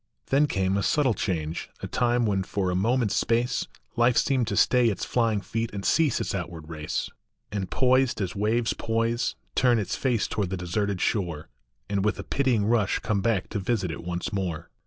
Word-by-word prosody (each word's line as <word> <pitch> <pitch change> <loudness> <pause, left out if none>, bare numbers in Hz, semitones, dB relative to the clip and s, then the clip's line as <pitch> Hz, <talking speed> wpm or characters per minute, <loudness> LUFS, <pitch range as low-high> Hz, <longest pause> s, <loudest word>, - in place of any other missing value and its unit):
Then 145 +2 +4
came 95 -4 0
a - - +1
subtle 135 +2 +2
change, 80 -6 -3
a - - -2
time 120 -1 +1
when 100 -3 +1
for 95 -1 -1
a - - -1
mo 115 +8 +2
ment 115 -6 0
s 100 - 0
space 120 +3 +1 0.3
Life 120 +1 +3
seemed 130 -5 +2
to - - -2
stay 125 -2 +4
its 100 - -3
flying 115 -4 +1
feet 115 +2 -2
and 100 -1 -5
cease 155 -6 +3
its - - -2
outward 85 -4 -5
race, 75 -2 -3 0.4
And, 100 -2 -3
poised 130 -2 +2
as 95 -3 -2
waves 110 +3 +1
poise, 115 +2 -1 0.2
turn 125 -2 +4
its 105 - -1
face 120 -6 0
toward 100 -4 -2
the 95 - -3
de 90 - -6
serted 100 +1 -1
shore, 85 -8 -1 0.4
And 100 -1 0
with 105 +1 +1
a - - -5
pitying 125 -7 +1
rush 110 -3 +2
come 105 -2 -1
back 105 -3 +1
to 105 - -2
visit 95 -3 -1
it 80 - -7
once 90 +3 -3
more. 90 -5 -3
105 Hz, 205 wpm, -26 LUFS, 95-120 Hz, 0.4 s, Then